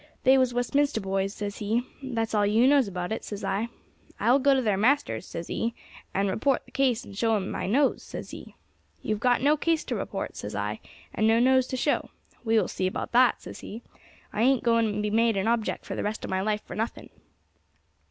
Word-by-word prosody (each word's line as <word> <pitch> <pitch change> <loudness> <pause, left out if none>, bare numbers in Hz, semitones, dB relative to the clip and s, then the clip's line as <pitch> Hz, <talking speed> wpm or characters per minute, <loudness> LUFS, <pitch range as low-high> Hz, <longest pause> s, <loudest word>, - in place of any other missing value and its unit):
'They 260 +1 +6
was 255 -1 +2
Westminster 260 +2 +1
boys,' 195 -1 -1
says 205 -1 -5
he. 220 +4 0 0.2
'That's 230 -5 -3
all 210 -1 +3
you 215 +4 +4
knows 275 -3 +5
about 180 0 -4
it,' 220 - -3
says 205 -1 -6
I. 195 +4 -1 0.5
'I 235 - +3
will 270 - +5
go 280 0 +4
to 265 - +2
their 210 -3 +2
masters,' 210 - +1
says 170 - -6
he, 230 +6 -2 0.4
'and 195 +1 0
report 245 +8 0
the - - -19
case, 255 -3 +1
and 200 - -11
show 225 +2 +2
him 190 -2 -4
my - - -3
nose,' 270 +7 +2
says - - -8
he. - - -10 0.5
'You 215 - 0
have 210 - -4
got 245 +2 +2
no 295 +2 +5
case 325 +1 +1
to - - -3
report,' - - -4
says - - -6
I, - - -3 0.3
'and 215 - +2
no 225 +1 +4
nose 260 +1 +4
to 260 - -3
show.' 290 +4 0 0.3
'We 225 -1 +2
will - - +2
see 185 - -1
about 185 - -4
that,' 245 +1 +4
says - - -9
he; 225 +3 -8 0.5
'I 210 - -1
ain't 260 +1 +3
going 230 -2 +3
to 210 0 -2
be 210 - -1
made 225 -1 +3
an 195 +3 0
object 230 -1 0
for - - -5
the - - -3
rest 210 +1 -3
of - - -6
my 190 0 0
life 210 +1 -1
for - - -8
nothing.' 225 +2 -4
225 Hz, 230 wpm, -27 LUFS, 205-255 Hz, 0.5 s, They